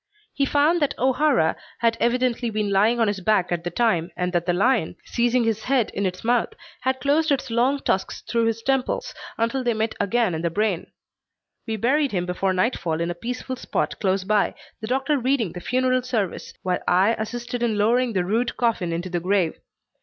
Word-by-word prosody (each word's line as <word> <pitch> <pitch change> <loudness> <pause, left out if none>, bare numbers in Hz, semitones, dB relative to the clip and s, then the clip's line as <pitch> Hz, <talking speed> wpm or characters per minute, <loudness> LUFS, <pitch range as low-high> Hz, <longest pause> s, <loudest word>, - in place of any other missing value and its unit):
He 275 -1 +1
found 305 +5 +3
that 290 - 0
O'Hara 260 - +2 0.2
had 230 -1 +2
evidently 245 0 +1
been 210 -2 -1
lying 215 +5 +3
on 225 - +3
his 205 -1 -1
back 190 -2 +1
at 170 -1 -1
the 175 - -2
time, 175 -4 +1
and 180 0 -1
that 175 0 0
the - - +3
lion, 205 -2 +1
seizing 240 +1 +1
his 225 -1 -1
head 255 -4 +1
in 200 0 -1
its 180 0 -6
mouth, 240 +1 +1 0.2
had 260 +1 -1
closed 295 +4 +2
its 265 -3 0
long 250 +5 +2
tusks 190 -7 -1
through 230 -1 0
his 225 0 -1
temples 270 0 0 0.2
until 230 +3 0
they 240 -2 +1
met 220 +1 -1
again 210 -1 +1
in 160 - -3
the 170 - 0
brain. 200 0 -1 0.8
We 225 - -1
buried 270 +4 +1
him 180 -2 0
before 180 +2 -1
nightfall 185 -4 0
in 170 +1 -1
a - - -2
peaceful 250 +7 -5
spot - - -2
close 190 -1 +1
by, 210 +1 +1 0.2
the 220 - -6
doctor 270 +4 +1
reading 250 -6 +1
the 180 - -8
funeral 255 +2 +1
service, 225 -7 -3
while 180 -1 0
I 190 +5 +4
assisted 240 +2 -4
in 230 -3 +1
lowering 235 +3 +2
the 185 -3 0
rude 230 +6 0
coffin 225 -8 0
into 175 +2 -3
the 175 - 0
grave. 180 -2 +1
225 Hz, 200 wpm, -23 LUFS, 185-250 Hz, 0.8 s, I